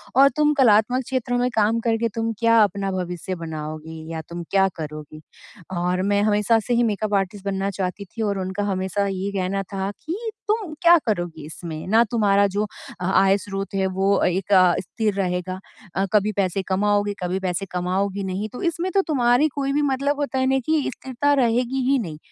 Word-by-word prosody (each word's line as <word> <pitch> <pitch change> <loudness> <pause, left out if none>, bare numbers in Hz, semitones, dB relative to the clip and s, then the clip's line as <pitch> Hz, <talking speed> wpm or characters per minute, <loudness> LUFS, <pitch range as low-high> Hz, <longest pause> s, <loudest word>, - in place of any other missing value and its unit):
और 275 +1 +7
तुम 300 0 +4
कलात्मक 245 -1 +4
क्षेत्रों 250 -1 -1
में 250 +1 +1
काम 220 +1 +2
करके 230 0 0
तुम 225 0 -1
क्या 230 0 +4
अपना 195 -1 -1
भविष्य 180 0 -4
बनाओगी? 160 -1 -7
या 160 -1 -4
तुम 170 0 -5
क्या 195 -1 +4
करोगी? 155 -1 -8 0.6
और 180 +1 0
मैं 200 +1 +2
हमेशा 210 +2 +3
से 245 - +1
ही 240 0 +3
मेकअप 215 -1 -1
आर्टिस्ट 195 0 -2
बनना 195 0 -1
चाहती 190 +1 -4
थी। 225 +5 -8
और 200 -2 0
उनका 190 +2 -3
हमेशा 190 +1 -1
ये 195 +1 -3
कहना 195 0 -1
था 195 0 -2
कि 425 +8 -4 0.2
तुम 425 -6 -1
क्या 345 0 +7
करोगी 175 - -2
इसमें? 160 0 -7
ना 225 +4 +5
तुम्हारा 200 -3 +3
जो 210 +1 +1 0.3
अ, 180 - -3
आय 195 +1 +4
स्रोत 195 0 -5
है 190 -1 +1
वो 195 +1 +2
एक 185 +2 0
अ, 185 -2 +6
स्थिर 210 +3 -2
रहेगा। 185 -1 -2 0.4
अ, 195 - +1
कभी 210 0 +3
पैसे 190 0 -1
कमाओगे, 205 +1 +1
कभी 180 +1 -1
पैसे 190 0 -2
कमाओगे 190 +2 -1
नहीं। 205 +3 -3
तो 250 - -7
इसमें 350 +2 -3
तो 390 - +3
तुम्हारी 250 -1 +3
कोई 275 -1 -1
भी 295 - +2
मतलब 280 +2 -1
होता 280 -2 -1
है 260 - +2
ना - - +2
कि 310 -2 +2
स्थिरता 265 +2 0
रहेगी 245 -2 +2 0.3
ही 275 - +4
नहीं। 165 -9 -5
200 Hz, 195 wpm, -23 LUFS, 185-235 Hz, 0.6 s, और